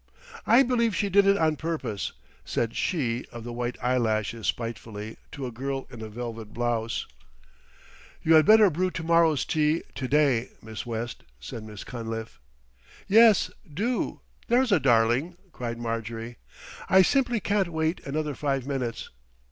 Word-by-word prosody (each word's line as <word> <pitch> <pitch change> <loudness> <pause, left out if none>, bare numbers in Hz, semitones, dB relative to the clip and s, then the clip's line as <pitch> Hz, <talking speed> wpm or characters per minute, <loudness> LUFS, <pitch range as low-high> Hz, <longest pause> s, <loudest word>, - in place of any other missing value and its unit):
"I 240 +5 +7
believe 235 -4 +1
she 205 - 0
did 200 +1 +5
it 200 0 +5
on 155 -3 +2
purpose," 135 -11 -3 0.3
said 110 +10 -2
she 125 - -1
of 120 -1 -8
the 120 0 -6
white 120 0 -3
eyelashes 115 -3 0
spitefully 110 -2 -4
to 140 - -5
a 125 - -4
girl 135 +3 -4
in 120 -3 -9
a 110 - -6
velvet 115 -1 -7
blouse. 115 -1 -1 1.2
"You 160 - +4
had 155 -1 +8
better 215 -3 +7
brew 185 +4 0
to 165 - -5
morrow's 165 -4 +3
tea 155 +1 +1
to 130 - -4
day, 135 -4 +2
Miss 110 +1 -8
West," 115 0 -4 0.2
said 85 - -7
Miss 105 -2 -9
Cunliffe. 115 - -6 0.7
"Yes, 220 0 +6 0.2
do, 225 - -2 0.3
there's 245 0 +3
a 190 - +5
darling," 125 +6 +2
cried 120 -4 -5
Marjorie. 115 0 -4 0.5
"I 190 0 +7
simply 245 0 +2
can't 200 -2 +1
wait 160 +1 -1
another 150 +1 -2
five 135 -2 -1
minutes. 130 -5 -3
130 Hz, 150 wpm, -26 LUFS, 115-170 Hz, 1.2 s, had